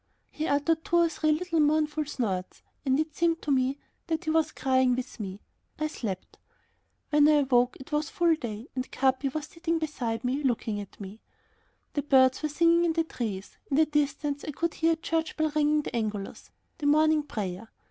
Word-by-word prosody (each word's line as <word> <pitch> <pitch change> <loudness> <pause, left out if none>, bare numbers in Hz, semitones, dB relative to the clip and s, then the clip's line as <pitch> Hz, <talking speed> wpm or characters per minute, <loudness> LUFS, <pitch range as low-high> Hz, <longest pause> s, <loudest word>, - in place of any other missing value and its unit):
He 310 +1 -3
uttered 315 +3 +1
two 345 - -1
or 340 -1 +5
three 310 0 +1
little 330 +1 0
mournful 305 0 +2
snorts, 200 -10 -3 0.2
and 265 0 +2
it 310 -1 -2
seemed 335 0 +1
to 290 - -1
me 265 +1 +2 0.3
that 325 0 -1
he 315 - -1
was 315 -1 +2
crying 260 -1 +2
with 255 0 -6
me. 195 -1 -6 0.4
I 310 - -1
slept. 210 - -5 0.7
When 295 0 +6
I 305 - +6
awoke 250 -2 +2
it 265 - -12
was 300 +1 0
full 340 -1 +3
day 235 -5 -5
and 255 0 -4
Capi 265 +1 +1
was 295 +2 -4
sitting 330 +1 -2
beside 265 -7 -3
me, 260 +3 0
looking 230 -5 -1
at 200 - -12
me. 200 +2 -8 0.7
The 290 - 0
birds 260 -3 +4
were 305 - -1
singing 335 +3 +4
in 335 -1 +2
the 330 0 +1
trees. 215 -10 -5
In 275 - +1
the 315 - +6
distance 290 -1 -1
I - - -5
could 335 +3 -1
hear 330 0 +2
a - - 0
church 320 0 -2
bell 315 -1 +1
ringing 300 0 +3
the - - -5
Angelus, 210 -3 -4 0.3
the 290 - -1
morning 310 +1 +4
prayer. 210 -6 -5
295 Hz, 200 wpm, -28 LUFS, 255-315 Hz, 0.7 s, When